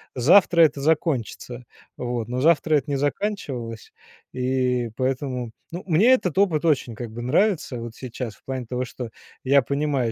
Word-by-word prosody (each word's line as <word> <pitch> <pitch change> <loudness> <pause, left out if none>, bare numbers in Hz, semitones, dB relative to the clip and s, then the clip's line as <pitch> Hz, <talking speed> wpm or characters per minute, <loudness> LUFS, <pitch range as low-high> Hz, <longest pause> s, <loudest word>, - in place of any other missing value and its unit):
завтра 170 +6 +5
это 150 -3 +4
закончится. 135 - -1 0.3
Вот, 120 -2 -3
но 125 +1 -2
завтра 155 +1 +3
это 145 0 0
не - - +1
заканчивалось. 135 - -3 0.4
И 125 -2 0
поэтому 130 -2 -2 0.2
ну, 175 +2 -6
мне 195 +9 +5
этот 190 - 0
опыт 170 -7 +2
очень 135 -8 +1
как 120 -2 -7
бы 120 +2 -7
нравится 150 - +1
вот 115 -1 -7
сейчас, 120 -3 -6
в - - -28
плане 130 -2 -4
того, 125 +2 -3
что 120 -1 -7 0.3
я 140 +1 +5
понимаю, 140 -3 -1
130 Hz, 160 wpm, -23 LUFS, 125-155 Hz, 0.4 s, завтра